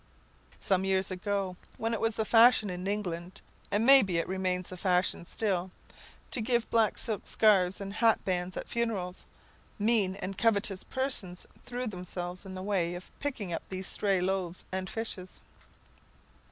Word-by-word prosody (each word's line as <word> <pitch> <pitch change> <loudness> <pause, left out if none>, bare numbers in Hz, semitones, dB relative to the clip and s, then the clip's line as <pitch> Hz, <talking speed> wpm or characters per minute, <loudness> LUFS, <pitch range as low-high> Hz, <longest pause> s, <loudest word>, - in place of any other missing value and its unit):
Some 190 -1 +1
years 190 0 0
ago, 185 0 -2 0.2
when 225 +1 -1
it 225 - -2
was 225 -1 +1
the 220 - -1
fashion 225 -3 +6
in 180 +1 -5
England 180 -3 -3 0.3
(and 205 +3 +1
may 270 +1 +9
be 185 -4 -1
it 165 - 0
remains 185 -1 -1
the 185 - -7
fashion 180 -2 +1
still) 190 -2 -1 0.6
to 245 - +2
give 235 0 +1
black 225 -2 +3
silk 220 -3 0
scarfs 195 -4 +3
and 195 0 -6
hatbands 185 -5 +1
at - - -5
funerals, 205 -6 -3 0.5
mean 210 -3 +3
and 195 -1 -6
covetous 205 -3 +2
persons 255 -10 -1 0.2
threw 250 +1 -3
themselves 180 -2 -5
in 190 - -7
the 185 - -6
way 180 -4 0
of 180 - -10
picking 235 -11 -3
up - - -2
these 190 0 -4
stray 195 -1 +2
loaves 185 -1 -2
and 190 0 -3
fishes. 200 -5 -5
195 Hz, 160 wpm, -30 LUFS, 180-220 Hz, 0.6 s, may